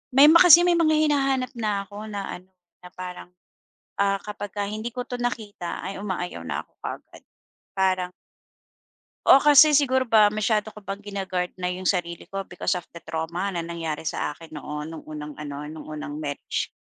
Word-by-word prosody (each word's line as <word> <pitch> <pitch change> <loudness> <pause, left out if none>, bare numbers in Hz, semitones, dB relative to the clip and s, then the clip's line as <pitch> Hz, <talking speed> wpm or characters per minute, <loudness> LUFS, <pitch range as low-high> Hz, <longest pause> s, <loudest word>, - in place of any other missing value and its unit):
may 280 +2 +9
ma 335 - +8
kasi 345 -1 +9
may 355 - +4
mga 315 -2 +3
hinahanap 275 -4 +1
na 205 -2 0
ako 205 +2 -9
na 205 -2 -4 0.2
ano, 185 - -24 0.3
na 180 - -12
parang, 180 -1 -7 0.7
ah, 195 0 +2
kapag 205 -1 -6
ka 205 - -1
hindi 215 +3 -4
ko 250 - -2
to 245 -1 -5
nakita 215 -7 -4
ay 195 +1 -5
umaayaw 180 - -4
na - - -3
ako - - -37
kaagad. - - -8 0.5
Parang 185 -2 +1 1.2
oh, 275 - +8
kasi 295 +1 +8
siguro 260 -3 +3
ba 215 -2 +6
masyado 215 0 0
ko - - -12
bang 200 0 -7
gina-guard 190 -3 -3
na 180 - -1
yung 180 +1 -4
sarili 175 -3 -1
ko 195 -1 -4
because 180 0 -1
of 175 - -17
the 170 - -10
trauma 170 +5 -3
na 175 - -3
nangyari 165 -2 -4
sa - - -1
akin 160 +1 -12
noon 150 +1 -5
noong 160 -1 -8
unang 150 -1 -7
ano, 145 -1 -6
nu'ng 155 +1 -8
unang 150 -1 -6
marriage, 145 -2 -3
195 Hz, 185 wpm, -25 LUFS, 170-220 Hz, 1.2 s, may